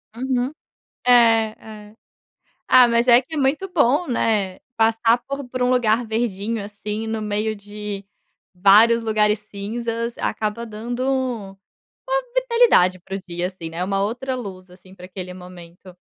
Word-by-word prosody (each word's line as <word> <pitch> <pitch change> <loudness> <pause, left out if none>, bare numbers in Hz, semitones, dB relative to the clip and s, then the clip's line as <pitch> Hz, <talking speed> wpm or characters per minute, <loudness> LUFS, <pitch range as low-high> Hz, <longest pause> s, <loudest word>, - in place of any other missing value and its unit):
Uhum. 255 +1 -1 0.5
É, 250 - +4 0.8
é. - - -23 0.7
Ah, 250 -1 +7
mas 235 +1 +1
é 240 0 +7
que 310 +5 -8
muito 290 +8 0
bom, 295 +1 +2
né, 210 -6 0 0.2
passar 225 +1 +3
por 275 -1 -5
por 255 0 -5
um 250 - +2
lugar 240 -2 +2
verdinho, 220 -1 -2
assim, 210 +2 -5
no 220 0 -3
meio 215 +1 -1
de 205 -1 -7 0.5
vários 210 +5 +5
lugares 215 -1 +2
cinzas, 230 +3 -5
acaba 215 +2 -2
dando 235 +3 -5
uma 230 -8 -3 0.6
vitalidade 470 - +3
para 190 +2 -6
o 195 - -8
dia, 175 +1 -2
assim, 185 -3 -8
né, 165 +2 -5
uma 195 +1 -1
outra 245 +6 -2
luz, 190 -7 -8
assim, 185 +1 -17
para 180 -1 -11
aquele 180 -1 -8
momento. 180 0 -13
220 Hz, 145 wpm, -21 LUFS, 195-245 Hz, 0.8 s, Ah